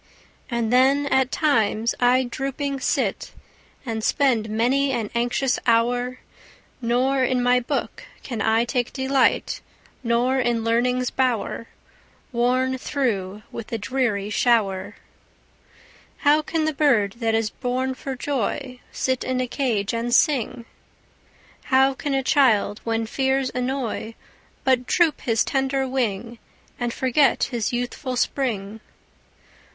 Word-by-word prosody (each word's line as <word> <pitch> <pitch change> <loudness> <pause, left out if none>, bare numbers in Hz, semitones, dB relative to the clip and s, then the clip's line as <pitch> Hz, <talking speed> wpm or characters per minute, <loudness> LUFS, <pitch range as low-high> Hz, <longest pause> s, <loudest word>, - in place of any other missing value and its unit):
Ah 235 0 0
then 260 +5 +3
at 265 -2 +2
times 230 - +1
I 250 +1 +4
drooping 275 +2 -3
sit, - - -1 0.5
And 225 -2 -3
spend 235 -6 +2
many 255 +6 +1
an 230 -5 -2
anxious 245 +2 0
hour; 245 +2 +1 0.6
Nor 255 +3 +1
in 255 -1 +1
my 250 0 +4
book 265 +3 -4 0.2
can 235 -4 -4
I 225 +1 +2
take 245 -1 -1
delight, 265 0 +1 0.4
Nor 245 +3 +1
sit 245 - +1
in 235 -1 0
learning's 250 +2 +1
bower, 245 -3 -1 0.6
Worn 255 +2 +1
through 210 -8 -2
with 230 - -7
the 230 - -3
dreary 210 -3 -1
shower. 205 -4 +1 1.3
How 295 +2 +5
can 315 0 -1
the 315 - 0
bird 235 -8 +2
that 225 -2 +1
is 225 -1 0
born 260 +1 -2
for 265 +1 -6
joy 255 0 -3
Sit 260 -1 -1
in 255 0 -1
a 255 - +1
cage 235 -7 -1
and 230 +1 -2
sing? 255 -3 +2 1.0
How 265 0 +4
can 280 +1 -3
a 270 - 0
child, 235 -8 +3
when 225 0 -1
fears 265 +2 0
annoy, 250 -3 -3 0.5
But 255 -2 +2
droop 335 -4 +2
his 230 -3 +1
tender 270 0 0
wing, 235 -3 -2 0.4
And 240 -1 -1
forget 260 +3 +2
his 235 -4 -1
youthful 245 +2 -3
spring! 220 -5 -2
250 Hz, 130 wpm, -23 LUFS, 230-265 Hz, 1.3 s, How